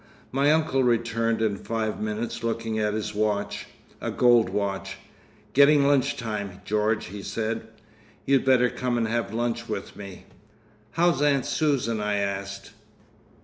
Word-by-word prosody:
My 140 +3 +3
uncle 155 -3 +2
returned 115 -1 +1
in 105 -2 0
five 110 -1 -3
minutes 110 +3 -3
looking 115 -1 -2
at 105 0 0
his 105 0 -3
watch—a 105 -1 -3
gold 120 -5 +4
watch—"Gettin' 130 +8 0
lunch 140 -2 +2
time, 100 -5 -4
George," 105 +1 0
he 100 +2 -8
said. 110 +1 -3 0.6
"You'd 135 -2 +3
better 125 -2 +4
come 125 -1 -1
and 115 -1 +1
have 115 -2 -1
lunch 120 0 -2
with 110 - -5
me!" 100 -2 -10 0.7
"How's 170 -4 +2
Aunt 140 -3 +3
Susan?" 130 -8 0
I 105 0 0
asked. 100 -1 -3
115 Hz, 135 wpm, -26 LUFS, 105-125 Hz, 0.7 s, gold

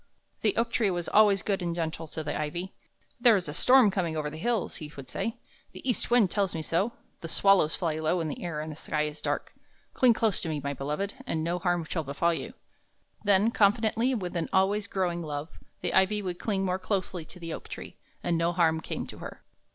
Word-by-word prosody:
The 210 -3 +1
oak 230 0 +1
tree 220 -4 +2
was 175 -2 -2
always 205 -2 +5
good 195 -2 0
and 170 -1 -2
gentle 165 -1 -3
to 160 +1 -5
the 145 - -3
ivy. 170 +5 -3 0.5
"There 240 -2 +6
is 185 -4 -1
a 150 - -4
storm 250 +4 +6
coming 170 -5 -1
over 150 -1 -2
the 155 - -7
hills," 235 +1 -1
he 150 -1 -8
would 135 -2 -8
say. 225 - -3 0.4
"The - - -9
east 245 - 0
wind 235 -6 +4
tells 195 -4 0
me 160 - -3
so; 190 +9 0 0.3
the 165 - -6
swallows 190 -2 +4
fly 160 -3 -1
low 160 +3 +1
in 165 - -1
the 150 - -5
air, 165 -4 -3
and 155 +1 -5
the - - -7
sky 150 0 -1
is 150 0 -5
dark. 145 0 -2 0.4
Cling 250 -2 +5
close 220 -3 +1
to 165 - -3
me, 155 -2 -1
my 140 0 -3
beloved, 150 +9 -3
and 160 -7 -1
no 170 +2 -1
harm 175 -1 +1
shall 160 +1 -2
befall 155 +4 +1
you." 230 +9 -5 0.7
Then, 205 +3 +4
confidently 225 +3 +3
and 240 - 0
with 180 - -4
an 165 -2 -1
always 200 +2 +2
growing 180 -3 -1
love, 150 -1 -5 0.2
the - - -1
ivy 200 +2 +3
would 180 -2 -4
cling 195 -3 0
more 185 0 0
closely 185 -2 -2
to 180 - -11
the 165 -2 -5
oak - - -7
tree, - - -8 0.3
and 170 -1 +1
no 170 +1 +1
harm 160 -2 +2
came - - -4
to - - -10
her. - - -9
175 Hz, 230 wpm, -28 LUFS, 160-205 Hz, 0.7 s, There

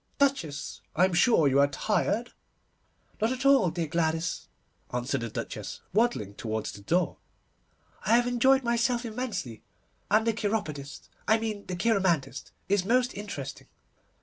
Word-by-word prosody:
Duchess, 265 - 0
I 180 - +5
am 190 - -1
sure 175 - +4
you 135 0 +3
are 140 - +6
tired?' 210 - 0 0.9
'Not 220 +2 +2
at 260 +1 -3
all, 275 -9 +6
dear 165 0 -2
Gladys,' 160 +1 -1 0.4
answered 125 +2 -1
the 115 - -3
Duchess, - - -6
waddling 205 - +1
towards 110 +1 -3
the 100 - -11
door. 175 - 0 0.9
'I 230 - +6
have 240 0 +4
enjoyed 260 +2 +3
myself 235 +1 +1
immensely, 215 - -4 0.5
and 215 +2 +4
the 230 - +2
cheiropodist, 200 -11 -3 0.2
I 220 - +5
mean 220 -2 -4
the 180 - -3
cheiromantist, 175 - +1 0.2
is 200 -2 +2
most 250 +5 +2
interesting. 145 - -7
200 Hz, 145 wpm, -28 LUFS, 145-235 Hz, 0.9 s, are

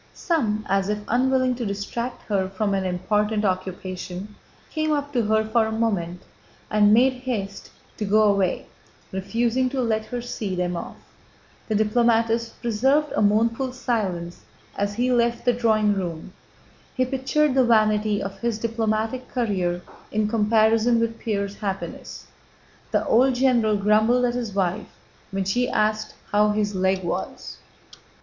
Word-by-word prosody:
Some, 220 - -1
as 195 0 +1
if 210 - 0
unwilling 255 +1 +2
to 245 - -3
distract 215 +4 -4
her 195 -3 -1
from 200 +1 -1
an 195 -1 0
important 210 +4 0
occupation, 185 +1 -4 0.4
came 310 -1 -1
up 290 -1 -1
to 245 - +2
her 220 0 +1
for 220 0 +2
a - - -3
moment 195 -6 -1 0.5
and 210 -1 +5
made 255 +4 +5
haste 205 -6 -4 0.3
to 210 - -2
go 215 +2 +4
away, 200 -3 +1 0.5
refusing 235 +6 0
to 270 0 -3
let 220 -3 0
her 245 - -4
see 220 -5 -4
them 180 0 -1
off. - - -6 0.7
The 220 - -1
diplomatist 230 +1 +1
preserved 265 +7 +2
a - - +1
mournful 230 +5 +2
silence 195 -9 -2 0.3
as 200 0 -2
he 250 +3 +1
left 235 -1 +1
the 245 - +4
drawing 220 -3 +2
room. 180 -2 -5 0.6
He 255 - +2
pictured 270 +3 +1
the 265 -1 +4
vanity 215 -3 +2
of 195 0 -6
his 235 -2 -1
diplomatic 225 +1 -1
career 185 -8 -1 0.3
in 215 0 +1
comparison 225 +1 +3
with 230 0 -1
Pierre's 200 -2 -2
happiness. 195 -2 -5 0.6
The - - 0
old 255 +2 +4
general 240 -5 +3
grumbled 215 +5 +3
at 240 - 0
his 240 -3 -3
wife 190 +1 -2 0.3
when 195 -1 -2
she 245 +6 0
asked 215 0 0 0.2
how 210 +1 +4
his 210 0 0
leg 190 0 +1
was. 175 - -5
215 Hz, 150 wpm, -24 LUFS, 200-240 Hz, 0.7 s, and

